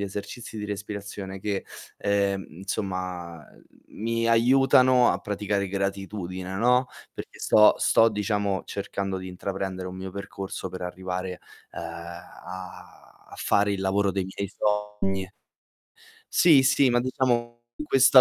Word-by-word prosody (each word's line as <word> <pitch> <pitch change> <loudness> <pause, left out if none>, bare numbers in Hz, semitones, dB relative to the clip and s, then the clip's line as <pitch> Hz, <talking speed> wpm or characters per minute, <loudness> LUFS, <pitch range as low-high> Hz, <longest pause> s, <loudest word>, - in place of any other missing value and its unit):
esercizi 105 +3 -6
di 105 - -4
respirazione 100 -1 -6
che, 100 -1 -3 0.3
ehm, 100 -1 +1
insomma, 90 -3 -4
uhm, - - -20 0.3
mi 115 +1 -1
aiutano 125 +1 +5
a - - 0
praticare 100 -1 -2
gratitudine, 95 -1 -3
no, 125 +4 +3 0.3
perché - - -9
sto 105 0 +6
sto, 115 - +5
diciamo, 105 -2 -1
cercando 100 -1 -3
di 95 - -7
intraprendere 95 0 -4
un 90 0 -6
mio 95 0 -6
percorso 95 -1 -6
per 90 - -7
arrivare, 90 0 -4 0.3
ehm, - - -6
a 85 +2 -9 0.3
a - - -10
fare 100 0 +2
il 95 - -2
lavoro 100 +1 +2
dei 95 -1 -1
miei 95 +1 -4
sogni. 105 -2 -1 1.0
Sì, 155 -6 +7
sì, 135 -1 +4
ma 120 0 +3
diciamo 120 -2 0 0.2
questa 135 -2 +7
100 Hz, 130 wpm, -26 LUFS, 95-110 Hz, 1.0 s, Sì